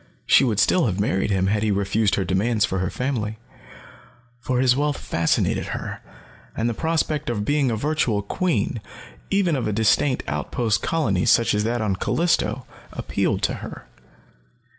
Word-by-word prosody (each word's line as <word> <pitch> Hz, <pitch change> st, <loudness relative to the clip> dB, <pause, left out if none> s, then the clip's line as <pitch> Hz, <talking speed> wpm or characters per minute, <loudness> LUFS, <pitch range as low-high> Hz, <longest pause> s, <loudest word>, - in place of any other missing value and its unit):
She -, -, +5 dB
would 110 Hz, -6 st, +1 dB
still 165 Hz, -, +3 dB
have 95 Hz, -2 st, -2 dB
married 100 Hz, -1 st, 0 dB
him 95 Hz, -2 st, +1 dB
had 105 Hz, +2 st, +1 dB
he 110 Hz, -, +1 dB
refused 100 Hz, +1 st, +1 dB
her 95 Hz, -, -1 dB
demands 105 Hz, +4 st, +1 dB
for 95 Hz, -, -2 dB
her 90 Hz, -1 st, -1 dB
family. 115 Hz, -5 st, -3 dB, 1.0 s
For 125 Hz, +1 st, -1 dB
his 125 Hz, -1 st, +4 dB
wealth 145 Hz, 0 st, 0 dB
fascinated 85 Hz, 0 st, 0 dB
her, -, -, -7 dB, 0.6 s
and 115 Hz, -, 0 dB
the 120 Hz, -, 0 dB
prospect 155 Hz, +1 st, -1 dB
of 105 Hz, -4 st, -2 dB
being 145 Hz, -1 st, +2 dB
a 115 Hz, -, 0 dB
virtual 120 Hz, -5 st, 0 dB
queen, 115 Hz, -, -1 dB, 0.5 s
even 190 Hz, -5 st, +2 dB
of 125 Hz, -5 st, -2 dB
a -, -, 0 dB
distant 110 Hz, +5 st, +2 dB
outpost 105 Hz, +9 st, -1 dB
colony 100 Hz, -, 0 dB
such 115 Hz, -, +4 dB
as 105 Hz, 0 st, +1 dB
that 120 Hz, +1 st, -1 dB
on 100 Hz, -3 st, 0 dB
Callisto, 170 Hz, -, 0 dB, 0.3 s
appealed -, -, -1 dB
to -, -, +1 dB
her. -, -, -9 dB
110 Hz, 165 wpm, -23 LUFS, 100-135 Hz, 1.0 s, She